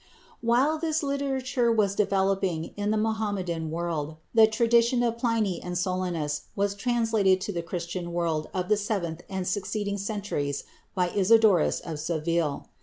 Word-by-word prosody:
While 255 +7 +2
this 320 -1 0
literature 270 -3 0
was 210 -3 +2
developing 195 -4 0
in 205 0 -2
the 215 - +2
Mohammedan 205 -7 -1
world, 160 -2 -3 0.2
the 225 -1 +7
tradition 235 +2 +3
of 230 -1 0
Pliny 225 -6 0
and 180 0 -4
Solinus 175 -5 -2
was 200 0 +1
transmitted 225 -4 +2
to 205 - -3
the 170 - -2
Christian 170 0 -5
world 165 -3 -1
of 180 -1 -2
the 210 - +3
seventh 185 -6 -2
and 190 -2 -3
succeeding 200 +1 -2
centuries 195 -9 -3 0.3
by 180 -2 +1
Isidorus 205 -2 +4
of 160 -3 -6
Seville. 160 -1 -1
195 Hz, 145 wpm, -27 LUFS, 170-225 Hz, 0.3 s, the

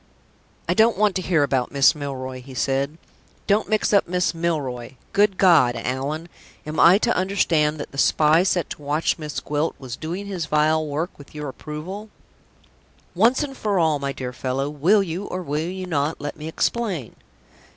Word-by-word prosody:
"I - - +2
don't 225 0 +4
want 210 -2 +2
to - - -2
hear 170 -5 +2
about 130 -3 0
Miss, 140 -1 +5
Milroy," 130 -3 -5
he 130 +1 -12
said. 135 +5 -1 0.5
"Don't 210 +2 +1
mix 215 -1 +1
up 200 - +4
Miss 180 +1 0
Milroy 135 -7 -3 0.2
Good 200 -1 +3
God, 160 -10 +5
Allan, 135 +7 -3 0.4
am 155 0 -4
I 175 +3 +7
to 235 +2 +1
understand 165 -5 +1
that - - -6
the 140 - -6
spy 155 +3 +4
set 180 -2 +1
to - - -7
watch 150 +4 0
Miss 150 -4 -4
Gwilt 150 +4 -2
was 130 -3 -7
doing 175 +7 -5
his 185 -6 -4
vile 155 +1 +2
work 155 +5 -3
with 145 +1 -14
your 150 -1 -4
approval?" 165 +10 -7 1.0
"Once 235 - +3
for 210 -5 -1
all, 160 -4 +2
my 140 0 -2
dear 125 -2 -6
fellow, 135 +3 -2
will 180 +8 +3
you, 180 +2 -4
or 185 -1 -4
will 155 +2 -2
you 185 0 -5
not, 155 -2 -1
let 145 0 -5
me 155 - -8
explain?" 180 - -2
155 Hz, 180 wpm, -23 LUFS, 140-185 Hz, 1.0 s, I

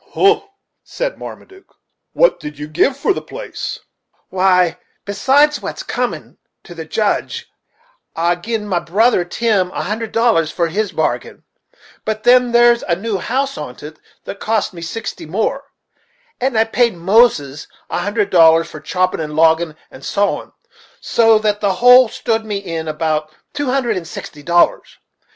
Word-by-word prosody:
"Hum," 410 +2 +4 0.4
said - - -4
Marmaduke, 385 0 -12 0.4
"what - - +3
did 150 -1 -8
you 150 +1 -6
give 215 - +1
for 390 - +1
the - - -5
place?" - - -6 0.5
"Why, 180 -2 +2 0.3
besides 280 +8 +2
what's - - -6
comin' - - -4 0.2
to 175 - -11
the 165 -1 -7
Judge, 210 +6 -2 0.7
I 170 +1 +2
gi'n 210 +5 -4
my 180 -4 0
brother 190 +4 +2
Tim 195 0 0
a - - -4
hundred 220 +3 -4
dollars 225 -9 +2
for 170 -2 -1
his 205 +3 -2
bargain; 155 -7 -3 0.6
but 215 0 -3
then 250 0 +5
there's 240 0 +5
a 170 - 0
new 200 +1 -3
house 270 - -2
on't, 145 -3 -8 0.4
that 200 - -8
cost 215 -2 -1
me 170 - -9
sixty 200 +1 -6
more, 220 - -2 0.7
and 255 -2 0
I 220 - +5
paid 230 -1 +1
Moses 170 - +2 0.2
a - - -1
hundred 205 0 -1
dollars 165 -1 +5
for 155 - -8
choppin', 185 +4 -1
and 150 -1 -5
loggin', 160 0 +3 0.2
and 130 - -13
sowin', 200 +6 -1 0.5
so 225 -1 +3
that 210 -1 -1
the 200 -2 +1
whole 250 +4 +7
stood 225 0 -1
to 220 - -14
me 205 -2 -2
in 165 -5 -5
about 155 0 -2 0.2
two 290 -1 -3
hundred 250 -5 0
and 170 -3 -6
sixty 150 -2 -9
dollars. 170 +3 +1
200 Hz, 160 wpm, -17 LUFS, 165-235 Hz, 0.7 s, whole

